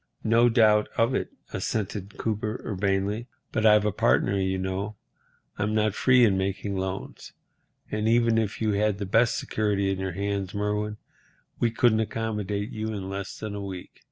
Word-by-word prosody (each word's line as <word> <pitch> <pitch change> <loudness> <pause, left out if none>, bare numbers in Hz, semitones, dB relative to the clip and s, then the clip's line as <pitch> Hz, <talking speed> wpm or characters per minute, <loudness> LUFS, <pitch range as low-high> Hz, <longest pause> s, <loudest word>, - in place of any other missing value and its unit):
"No 115 +2 +4
doubt 110 -3 +4
of 115 +3 +3
it," - - -1 0.2
assented 100 -1 -3
Cooper, 110 +1 -2
urbanely, 100 +3 -1 0.2
"but 110 -1 +2
I've 105 -1 +6
a 105 - +2
partner, 70 +5 +2
you 95 0 0
know. 95 +3 -3 0.6
I'm 105 +1 0
not 110 -1 +2
free 125 +2 +5
in 95 -3 +2
making 100 +1 -2
loans. 95 0 -5 0.6
And 105 +1 -1
even 115 0 +4
if 110 -2 -2
you 110 - +2
had 105 0 +1
the 100 - -3
best 115 +4 +3
security 100 -2 0
in 95 - -2
your 95 -1 -3
hands, 100 +1 -2
Merwin, 105 +1 -1 0.6
we 120 - +3
couldn't 115 -1 +3
accommodate 105 -2 -2
you 110 0 -4
in 100 -3 -4
less 100 0 -5
than 110 -1 -5
a 100 - -4
week. 95 -2 -8
105 Hz, 170 wpm, -26 LUFS, 95-110 Hz, 0.6 s, I've